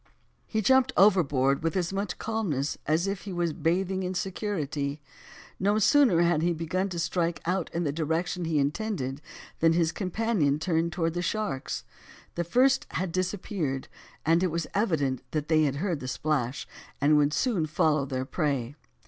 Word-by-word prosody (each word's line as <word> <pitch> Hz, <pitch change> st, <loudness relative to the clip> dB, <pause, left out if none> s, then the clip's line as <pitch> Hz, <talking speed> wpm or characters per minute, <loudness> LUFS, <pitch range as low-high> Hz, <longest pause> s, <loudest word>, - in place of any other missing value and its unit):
He 220 Hz, -1 st, -1 dB
jumped 260 Hz, +3 st, +4 dB
overboard 145 Hz, -9 st, +4 dB
with 165 Hz, +2 st, -1 dB
as 180 Hz, 0 st, -1 dB
much 195 Hz, -2 st, -2 dB
calmness 175 Hz, -12 st, -2 dB
as 160 Hz, +4 st, +2 dB
if 195 Hz, -1 st, -2 dB
he 200 Hz, -, -7 dB
was 175 Hz, -3 st, -1 dB
bathing 185 Hz, +4 st, 0 dB
in 185 Hz, 0 st, -3 dB
security. 160 Hz, -7 st, -2 dB, 0.6 s
No 205 Hz, +3 st, +2 dB
sooner 215 Hz, -4 st, +5 dB
had 170 Hz, -2 st, +2 dB
he 175 Hz, +1 st, +2 dB
began 170 Hz, +4 st, -2 dB
to 175 Hz, -, -5 dB
strike 170 Hz, -1 st, 0 dB
out 180 Hz, 0 st, -1 dB
in 170 Hz, -, -1 dB
the 145 Hz, -, 0 dB
direction 165 Hz, +3 st, -1 dB
he 160 Hz, -2 st, 0 dB
intended, 145 Hz, -2 st, -1 dB, 0.4 s
than 165 Hz, 0 st, +4 dB
his 165 Hz, -1 st, +2 dB
companion 185 Hz, -7 st, 0 dB
turned 165 Hz, 0 st, 0 dB
towards 165 Hz, -1 st, -1 dB
the 175 Hz, -, -2 dB
sharks. 205 Hz, -, -2 dB, 0.5 s
The 175 Hz, -, -1 dB
first 260 Hz, +10 st, +3 dB
had 185 Hz, -2 st, -2 dB
disappeared, 180 Hz, -6 st, -2 dB, 0.4 s
and 165 Hz, +2 st, +4 dB
it 185 Hz, -, +3 dB
was 170 Hz, +1 st, -2 dB
evident 155 Hz, -, 0 dB
they 155 Hz, +1 st, +2 dB
had 140 Hz, -1 st, 0 dB
heard 170 Hz, 0 st, -1 dB
the 130 Hz, -, -6 dB
splash, 135 Hz, -1 st, -1 dB, 0.3 s
and 145 Hz, +2 st, +4 dB
would 145 Hz, 0 st, +3 dB
soon 185 Hz, -, 0 dB
follow 155 Hz, -1 st, +2 dB
their 130 Hz, -1 st, -2 dB
prey. 140 Hz, -5 st, -1 dB
170 Hz, 165 wpm, -27 LUFS, 150-190 Hz, 0.6 s, sooner